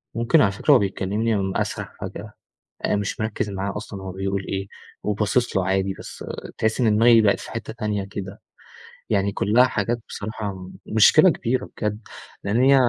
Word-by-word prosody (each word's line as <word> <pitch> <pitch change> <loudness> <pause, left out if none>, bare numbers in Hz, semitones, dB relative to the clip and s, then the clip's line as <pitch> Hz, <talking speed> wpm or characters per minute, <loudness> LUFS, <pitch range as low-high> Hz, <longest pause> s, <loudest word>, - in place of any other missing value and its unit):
ممكن 120 +7 +4
على 100 - +4
فكرة 100 +9 +1
وهو 135 - +7
بيكلمني 100 +1 -1
اسرح - - -4
فجأة، - - -7 0.5
آآ - - +1
مش 100 0 -2
مركز 110 -1 -2
معاه 100 0 -3
أصلًا 100 -2 -7
هو 95 - -5
بيقول 95 +1 -3
إيه 95 0 -3 0.4
وباصص 105 +2 0
له 95 - +1
عادي، 95 0 +1
بس - - -9 0.3
تحس 110 +2 0
إن 110 -3 +3
دماغي 115 +1 +6
بقيت 100 -2 +3
في - - -9
حتة 115 -1 -5
تانية 105 -3 -2
كده، 95 0 -7 0.7
يعني 100 -2 +1
كلها 110 +6 +4
حاجات 120 -1 -1
بصراحة 100 -3 -5 0.2
مشكلة 155 - +6
كبيرة 130 -5 -1
بجد، 105 -1 -2 0.4
لإن 105 +5 +1
هي 135 +1 +6
105 Hz, 170 wpm, -23 LUFS, 95-115 Hz, 0.7 s, وهو